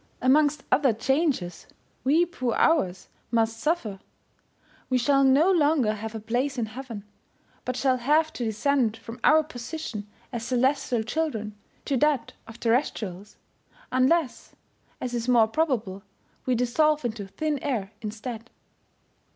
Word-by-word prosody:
Amongst 290 Hz, +2 st, +3 dB
other 260 Hz, -2 st, +4 dB
changes, 260 Hz, -, -1 dB, 0.4 s
we 310 Hz, +6 st, +4 dB
poor 255 Hz, -9 st, -2 dB
Hours 190 Hz, -, +2 dB, 0.2 s
must 225 Hz, -1 st, +1 dB
suffer; 240 Hz, -, -1 dB, 0.9 s
we 255 Hz, -, +3 dB
shall 275 Hz, +2 st, +3 dB
no 280 Hz, +8 st, +5 dB
longer 295 Hz, -, +3 dB
have 220 Hz, +1 st, -6 dB
a -, -, -3 dB
place 245 Hz, +6 st, -1 dB
in 235 Hz, -, 0 dB
heaven, 230 Hz, -2 st, -8 dB, 0.6 s
but 255 Hz, -, -2 dB
shall 260 Hz, 0 st, +2 dB
have 305 Hz, +5 st, +2 dB
to 245 Hz, -, -4 dB
descend 230 Hz, +1 st, +1 dB
from 230 Hz, +2 st, -10 dB
our 310 Hz, +1 st, +6 dB
position 245 Hz, -5 st, -6 dB, 0.3 s
as 235 Hz, -2 st, -3 dB
celestial 250 Hz, -1 st, +1 dB
children 220 Hz, -5 st, -2 dB, 0.3 s
to 275 Hz, -, 0 dB
that 280 Hz, -3 st, +1 dB
of 225 Hz, +1 st, -11 dB
terrestrials, 215 Hz, -6 st, -1 dB, 0.5 s
unless, 260 Hz, +3 st, +1 dB, 0.4 s
as 250 Hz, -1 st, -4 dB
is 235 Hz, 0 st, -2 dB
more 235 Hz, -3 st, +5 dB
probable, 225 Hz, -8 st, -1 dB, 0.5 s
we 255 Hz, -, +3 dB
dissolve 290 Hz, +5 st, +2 dB
into 215 Hz, -4 st, -3 dB
thin 295 Hz, +9 st, -2 dB
air 220 Hz, -9 st, -2 dB
instead. 225 Hz, +2 st, -6 dB
250 Hz, 135 wpm, -26 LUFS, 225-290 Hz, 0.9 s, our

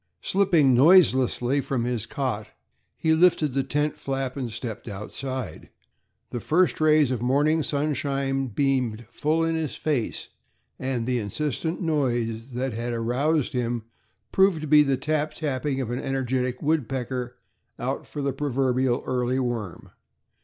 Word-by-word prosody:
Slipping 175 Hz, -9 st, +3 dB
noiselessly 130 Hz, -3 st, +5 dB
from 130 Hz, -3 st, -2 dB
his 120 Hz, -2 st, -2 dB
cot, 130 Hz, -8 st, -3 dB, 0.5 s
he 160 Hz, -1 st, +2 dB
lifted 160 Hz, -4 st, +3 dB
the 135 Hz, -, +2 dB
tent 150 Hz, +2 st, -1 dB
flap 135 Hz, -1 st, -3 dB
and 130 Hz, -4 st, -4 dB
stepped 110 Hz, -1 st, -6 dB
outside. 125 Hz, +5 st, -6 dB, 0.6 s
The 120 Hz, -, -3 dB
first 170 Hz, -, +2 dB
rays 155 Hz, -3 st, +4 dB
of 125 Hz, -3 st, -2 dB
morning 145 Hz, +6 st, +2 dB
sunshine 140 Hz, -2 st, -1 dB
beamed 125 Hz, -2 st, 0 dB
full 155 Hz, +5 st, 0 dB
in 165 Hz, 0 st, +1 dB
his 160 Hz, -3 st, -2 dB
face, 140 Hz, -8 st, -2 dB, 0.5 s
and 130 Hz, -3 st, -2 dB
the 125 Hz, 0 st, 0 dB
insistent 150 Hz, -, -3 dB
noise 120 Hz, -6 st, -1 dB
that 125 Hz, 0 st, -2 dB
had 120 Hz, +2 st, -3 dB
aroused 135 Hz, +6 st, 0 dB
him 120 Hz, -2 st, -1 dB, 0.5 s
proved 190 Hz, -4 st, +3 dB
to 155 Hz, -, -4 dB
be 150 Hz, +1 st, +7 dB
the 140 Hz, -2 st, +2 dB
tap 150 Hz, +2 st, -1 dB
tapping 140 Hz, -2 st, -2 dB
of 120 Hz, -2 st, -3 dB
an 120 Hz, -, -2 dB
energetic 130 Hz, -1 st, -2 dB
woodpecker 130 Hz, -4 st, -1 dB, 0.4 s
out -, -, -3 dB
for 145 Hz, -, -5 dB
the 140 Hz, -1 st, 0 dB
proverbial 130 Hz, -2 st, 0 dB
"early 125 Hz, 0 st, 0 dB
worm." 120 Hz, -8 st, -3 dB
135 Hz, 140 wpm, -25 LUFS, 120-150 Hz, 0.6 s, be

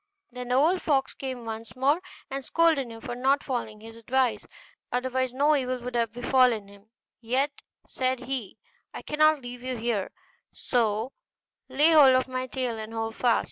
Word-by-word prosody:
Then 250 Hz, 0 st, -7 dB
the 250 Hz, -, +1 dB
old 330 Hz, +7 st, +3 dB
fox 275 Hz, -4 st, +1 dB
came 260 Hz, -3 st, -6 dB
once 225 Hz, 0 st, -7 dB
more, 280 Hz, +6 st, +2 dB, 0.3 s
and 275 Hz, 0 st, -4 dB
scolded 320 Hz, -5 st, +2 dB
him 225 Hz, 0 st, -10 dB
for 245 Hz, -4 st, -5 dB
not 270 Hz, +3 st, +2 dB
following 225 Hz, -5 st, -4 dB
his 225 Hz, +1 st, -11 dB
advice; 250 Hz, +1 st, 0 dB, 0.5 s
otherwise 260 Hz, 0 st, -1 dB
no 290 Hz, +4 st, +3 dB
evil 255 Hz, -2 st, -1 dB
would 245 Hz, +1 st, -6 dB
have 230 Hz, -2 st, 0 dB
befallen 245 Hz, -3 st, +2 dB
him: 200 Hz, +1 st, -18 dB, 0.3 s
'Yet,' 265 Hz, +5 st, -1 dB, 0.3 s
said 255 Hz, -1 st, -1 dB
he, 250 Hz, -6 st, -5 dB, 0.4 s
'I -, -, -7 dB
cannot 310 Hz, -1 st, +3 dB
leave 245 Hz, 0 st, -8 dB
you 255 Hz, 0 st, -4 dB
here, 225 Hz, -4 st, -1 dB, 0.4 s
so 225 Hz, 0 st, -1 dB, 0.6 s
lay 300 Hz, +4 st, +4 dB
hold 280 Hz, -5 st, +7 dB
of 255 Hz, -, +2 dB
my 255 Hz, 0 st, -3 dB
tail 250 Hz, -3 st, -3 dB
and 220 Hz, 0 st, -7 dB
hold 225 Hz, 0 st, -2 dB
fast. 240 Hz, 0 st, +2 dB
255 Hz, 175 wpm, -27 LUFS, 230-270 Hz, 0.6 s, hold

